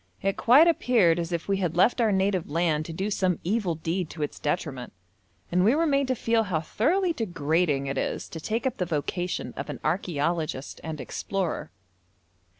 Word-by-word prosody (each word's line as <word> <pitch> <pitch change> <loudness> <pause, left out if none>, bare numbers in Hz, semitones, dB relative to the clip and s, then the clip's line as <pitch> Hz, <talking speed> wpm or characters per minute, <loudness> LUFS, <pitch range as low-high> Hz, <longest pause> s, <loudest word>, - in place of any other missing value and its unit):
It 195 0 +1
quite 275 +8 +6
appeared 225 - +3
as 170 0 -3
if 170 -2 -3
we 200 -1 +1
had 175 -3 -2
left 240 +7 +4
our 220 -2 +3
native 190 -2 +1
land 155 -1 +1
to - - -6
do 190 +6 -3
some 185 -3 +1
evil 190 -2 0
deed 165 +2 -2
to 155 - -5
its 145 - -5
detriment, 145 -5 -3 0.6
and 180 +1 +3
we 225 +7 +4
were 330 +2 +2
made 280 -3 +2
to 260 - +1
feel 230 -1 +1
how 180 -5 0
thoroughly 335 - +1
degrading 165 - 0
it 135 0 -2
is - - -3
to 165 - -7
take 225 - -2
up 260 -1 -1
the 180 - 0
vocation 175 +3 -2
of - - -6
an - - -4
archæologist 165 -5 -1
and 160 -2 -5
explorer. 180 -4 -3
180 Hz, 190 wpm, -26 LUFS, 160-220 Hz, 0.6 s, quite